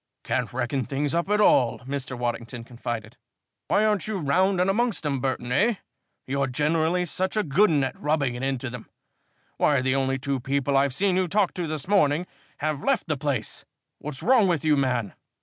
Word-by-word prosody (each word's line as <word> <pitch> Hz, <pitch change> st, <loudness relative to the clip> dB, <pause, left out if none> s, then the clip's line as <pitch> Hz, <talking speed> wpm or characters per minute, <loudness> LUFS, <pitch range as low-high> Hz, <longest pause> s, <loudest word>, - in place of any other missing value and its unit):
"Can't 125 Hz, -, -1 dB
reckon 130 Hz, +2 st, -1 dB
things 140 Hz, +2 st, -2 dB
up 170 Hz, +3 st, 0 dB
at 210 Hz, 0 st, +2 dB
all," 125 Hz, -, +4 dB
Mr. 130 Hz, -1 st, -5 dB
Waddington 120 Hz, 0 st, -4 dB
confided. 120 Hz, -2 st, -6 dB, 0.5 s
"Why 215 Hz, -, +3 dB
aren't 210 Hz, -4 st, +1 dB
you 215 Hz, -2 st, -2 dB
round 185 Hz, +5 st, +2 dB
and 180 Hz, -, +3 dB
amongst 215 Hz, -3 st, 0 dB
'em, 140 Hz, -2 st, 0 dB
Burton, 130 Hz, -2 st, -2 dB
eh? 210 Hz, -, +3 dB, 0.5 s
You're 140 Hz, +1 st, 0 dB
generally 160 Hz, +6 st, +1 dB
such 185 Hz, +4 st, -1 dB
a 215 Hz, -, +2 dB
good 190 Hz, +7 st, +3 dB
'un 145 Hz, -3 st, +2 dB
at 130 Hz, -, -4 dB
rubbing 145 Hz, -4 st, +1 dB
it 120 Hz, -, -6 dB
into 135 Hz, -2 st, -2 dB
them. 125 Hz, -2 st, -9 dB, 0.7 s
Why, 145 Hz, -2 st, +3 dB
the 130 Hz, 0 st, +1 dB
only 135 Hz, -1 st, 0 dB
two 135 Hz, 0 st, -2 dB
people 140 Hz, +2 st, 0 dB
I've 135 Hz, -1 st, +2 dB
seen 190 Hz, 0 st, +2 dB
you 185 Hz, -1 st, +1 dB
talk 200 Hz, +2 st, +1 dB
to 175 Hz, -2 st, -3 dB
this 155 Hz, -1 st, -5 dB
morning 175 Hz, -5 st, +3 dB, 0.4 s
have 150 Hz, -1 st, -2 dB
left 270 Hz, -6 st, +1 dB
the 155 Hz, -, +1 dB
place! 135 Hz, -6 st, -3 dB, 0.4 s
What's 145 Hz, -2 st, -6 dB
wrong 240 Hz, -4 st, +5 dB
with 165 Hz, -4 st, 0 dB
you, 155 Hz, -1 st, +4 dB
man?" 125 Hz, -7 st, 0 dB
140 Hz, 195 wpm, -25 LUFS, 130-180 Hz, 0.7 s, wrong